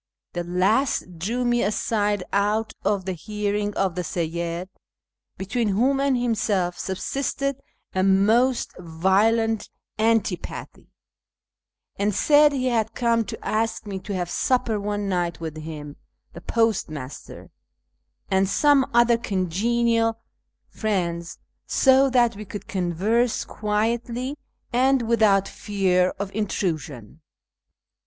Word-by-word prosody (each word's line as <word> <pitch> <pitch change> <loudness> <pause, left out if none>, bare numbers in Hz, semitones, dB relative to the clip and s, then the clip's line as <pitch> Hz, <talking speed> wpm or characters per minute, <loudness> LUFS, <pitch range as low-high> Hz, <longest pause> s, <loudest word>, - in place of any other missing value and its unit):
The 175 - -2
last 185 +1 0
drew 235 +8 -1
me 240 0 +2
aside 205 -1 0
out 210 +2 +1
of 200 -2 0
the 190 - -2
hearing 205 +3 -2
of 190 -3 0
the 180 - -2
Seyyid 170 +1 -3 0.7
(between 220 +4 -1
whom 250 +8 +2
and 275 -2 +2
himself 205 -7 0
subsisted 275 +8 -2 0.4
a 185 - +1
most 215 +7 +3
violent 200 +7 +1 0.3
antipathy), 220 -5 -1 1.1
and 200 0 +1
said 295 0 +5
he 265 -2 -1
had 225 -3 0
come 235 -1 +2
to - - -8
ask 225 +1 -1
me 195 -2 -5
to 200 +1 -5
have 175 -1 -3
supper 240 -4 +1
one 205 0 -2
night 175 -3 -1
with 160 -2 -6
him, 150 -2 -8 0.4
the 170 - -10
postmaster, 165 - -2 0.8
and 190 0 +3
some 285 +2 +3
other 235 -1 +5
congenial 225 +4 +1 0.5
friends, 175 -5 -2 0.3
so 270 0 +4
that 240 -3 +3
we 210 - -7
could 205 0 -8
converse 200 +7 0
quietly 235 +5 -2 0.4
and 260 +1 +3
without 215 -4 +3
fear 185 -3 +1
of 195 0 -5
intrusion. 160 - -3
210 Hz, 115 wpm, -24 LUFS, 185-235 Hz, 1.1 s, said